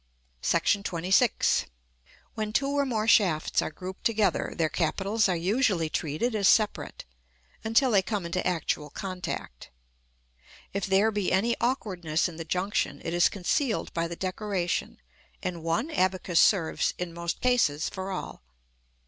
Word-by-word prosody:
§ 200 0 +2
XXVI. 185 +6 +2 0.7
When 215 -1 -3
two 275 +5 +1
or 280 0 +1
more 220 -3 -1
shafts 180 -9 +3
are - - -2
grouped 185 +3 -9
together, 215 -5 +1
their 165 -2 +2
capitals 195 +6 0
are 180 - +1
usually 185 -2 +1
treated 160 +10 -1
as 205 -3 +2
separate, 215 -2 +1 0.6
until 230 +4 +3
they 200 -3 +5
come 200 -1 -3
into 175 +2 -2
actual 155 -3 -1
contact. 180 - -6 1.0
If 200 -1 -2
there 195 +3 +3
be 205 -3 -1
any 220 +6 +2
awkwardness 185 - 0
in 170 -3 -9
the 165 - -6
junction, 185 +5 -1
it 165 - -2
is 175 0 +4
concealed 220 - -1
by 165 0 -1
the 170 - -6
decoration, 185 -1 -2 0.5
and 175 -2 -3
one 165 - -1
abacus 185 - +1
serves, 175 -6 +3
in 175 -1 -4
most 170 0 -3
cases, 235 -13 +2
for 190 0 -5
all. 185 - -6
190 Hz, 145 wpm, -27 LUFS, 170-215 Hz, 1.0 s, they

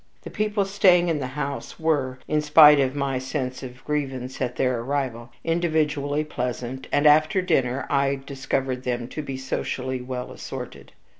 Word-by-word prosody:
The - - -8
people 210 -1 0
staying 185 -3 +4
in 160 -3 0
the 130 - -3
house 140 -1 -4
were, 145 -6 0
in 150 0 +1
spite 150 -1 +8
of 135 0 +1
my 135 -2 -1
sense 130 -1 -4
of 130 0 -10
grievance 135 -4 -3
at 125 -1 -1
their 125 -2 +1
arrival, 125 -2 -3
individually 155 -3 0
pleasant, 125 -2 -4
and 145 - +2
after 155 +4 +5
dinner 135 -8 0
I 140 0 +1
discovered 135 -2 -2
them 120 -2 -2
to 155 - -5
be 135 -3 -5
socially 130 -1 -3
well 125 0 -5
assorted. - - -8
140 Hz, 160 wpm, -24 LUFS, 130-150 Hz, -, spite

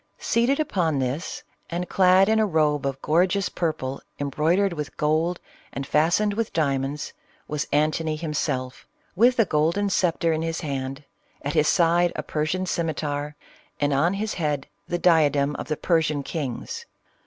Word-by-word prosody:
Seated 245 +5 +1
upon 175 - 0
this, 135 +6 -3 0.3
and 175 +1 -3
clad 190 0 +5
in 220 0 +3
a 220 - +4
robe 150 -5 +1
of 135 -1 -3
gorgeous 180 +4 +2
.purple 140 -6 -3 0.2
embroidered 165 +7 +1
with 150 -3 -6
gold 160 +4 +1 0.3
and 135 - -5
fastened 170 +9 +2
with 225 +1 -2
diamonds, 140 -2 -1 0.3
was 150 -1 -2
Antony 155 +2 +1
himself, 145 -5 -3 0.3
with 240 +6 +4
a 225 - +5
golden 170 +7 +1
sceptre 170 -3 +1
in 160 - -1
his 165 0 -2
hand, 135 -2 -4 0.4
at 145 - -2
his 155 -1 +3
side 175 0 +3
a - - -3
jrsian 160 +5 -2
scimitar, 150 -3 -2 0.4
and 145 -1 +1
on 165 +8 +2
his 215 +2 -2
head 150 -4 -1 0.2
the 175 - -1
diadcrn 150 -5 +3
of - - -6
the 155 - -2
Persian 155 -4 +1
kings. 160 - -5
160 Hz, 155 wpm, -24 LUFS, 145-180 Hz, 0.4 s, clad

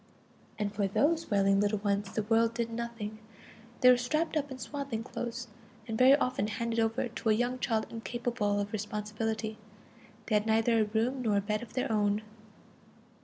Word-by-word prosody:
And 210 -1 -2
for 205 -1 0
these 315 - +1
wailing 195 -1 +3
little 205 +1 +2
ones 200 -1 -1
the 215 - -1
world 225 +2 +2
did 230 -1 -2
nothing. 230 -2 -5 0.6
They 250 - +9
were 250 - +5
strapped 305 +7 -1
up 290 -2 0
in 260 - -7
swaddling 265 -3 -4
clothes, 240 +1 -5 0.4
and 225 - -3
very 255 +4 +7
often 255 -7 0
handed 230 +1 -2
over 225 +3 +1
to 230 -1 -3
a - - +6
young 245 +3 0
child 225 -3 0
incapable 230 -2 -1
of 205 +1 -3
responsibility; 215 +1 -3 0.7
they 220 - -2
had 210 +1 +2
neither 225 +1 +3
a 215 - +3
room 230 +5 0
nor 215 -4 +2
a - - +2
bed 210 +1 -1
of 240 - -10
their 255 -2 -1
own. 210 0 +1
225 Hz, 180 wpm, -30 LUFS, 210-245 Hz, 0.7 s, They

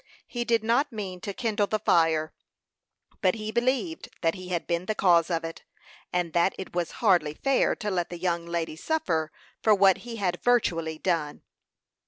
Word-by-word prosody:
He 240 -1 -4
did 230 -2 +2
not 245 +6 +2
mean 190 -5 -6
to 200 - -4
kindle 210 -1 0
the 215 - 0
fire, 165 -6 +2 0.9
but 185 0 +3
he 215 -1 -4
believed 260 +8 -1
that 165 -1 +2
he 185 -1 -9
had 175 -2 -2
been 170 +1 -2
the 215 - 0
cause 170 -4 +4
of 165 -2 -1
it, 165 0 -7 0.5
and 175 -2 -1
that 175 +2 +2
it 190 - -7
was 175 -1 -1 0.2
hardly 170 -7 +4
fair 275 - +2
to 210 -3 -3
let 175 -2 -1
the 175 - -6
young 170 -1 -1
lady 170 -2 -2
suffer 165 - -1 0.3
for 215 -1 +5
what 195 -1 +5
he 240 -1 -8
had 180 -5 -2
virtually 165 -10 +1
done. 160 -4 -1
185 Hz, 185 wpm, -27 LUFS, 170-220 Hz, 0.9 s, for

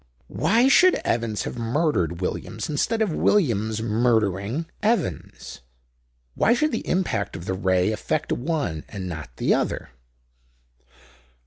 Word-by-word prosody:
"Why 225 +11 +3
should 365 +7 +6
Evans 115 -2 -1
have 120 - -5
murdered 115 - 0
Williams 105 +3 -3
instead 220 +10 0
of 195 -7 -1
Williams 110 - +1
murdering 110 - +1 0.2
Evans? 195 - -2 0.7
Why 235 - +3
should 305 +5 +1
the 230 - -4
impact 170 - -1
of 85 - -7
the 95 - -2
Ray 95 +1 +1
affect 105 - -2
one 140 - -2
and 95 -3 -6
not 80 -6 -6
the - - +2
other?" - - -1
115 Hz, 125 wpm, -24 LUFS, -, 0.7 s, should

